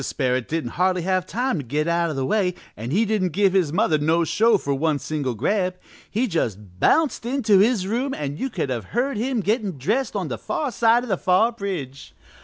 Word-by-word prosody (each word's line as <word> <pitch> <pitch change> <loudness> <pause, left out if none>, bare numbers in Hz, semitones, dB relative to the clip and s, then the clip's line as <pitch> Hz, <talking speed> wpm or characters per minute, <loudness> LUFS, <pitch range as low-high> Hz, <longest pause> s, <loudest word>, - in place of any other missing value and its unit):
Sperrit 130 -2 -1
didn't 155 -7 -3
hardly 185 -1 +2
have 185 0 0
time 245 -2 -1
to - - -4
get 150 +5 -1
out 170 0 +1
o' 155 - -4
the 135 -1 -1
way 185 0 +1 0.2
an' 115 +3 -6
he 205 - +2
didn't 195 -6 0
give 195 -2 +3
his 180 -6 +2
mother 160 -4 +2
no 160 +3 +2
show 220 +6 +3
for 140 -6 -2
one 150 +2 +1
single 140 -4 -3
grab, 185 - 0 0.3
he 230 +5 0
just 105 - -3
bounced 315 - +2
into 235 -5 +2
his 210 -2 +3
room 245 +7 -1
and 145 - -4
you 270 - -2
could 160 - -3
have 115 -5 -3
heard 270 +2 +1
him 240 +1 -1
gettin' 205 - -1
dressed 215 - -1
on 190 -5 -2
the 120 -5 -5
far 290 - -2
side 235 +1 +3
o' - - -7
the 195 -5 0
far 190 +6 +3
bridge. 175 - -6
185 Hz, 215 wpm, -23 LUFS, 145-225 Hz, 0.3 s, give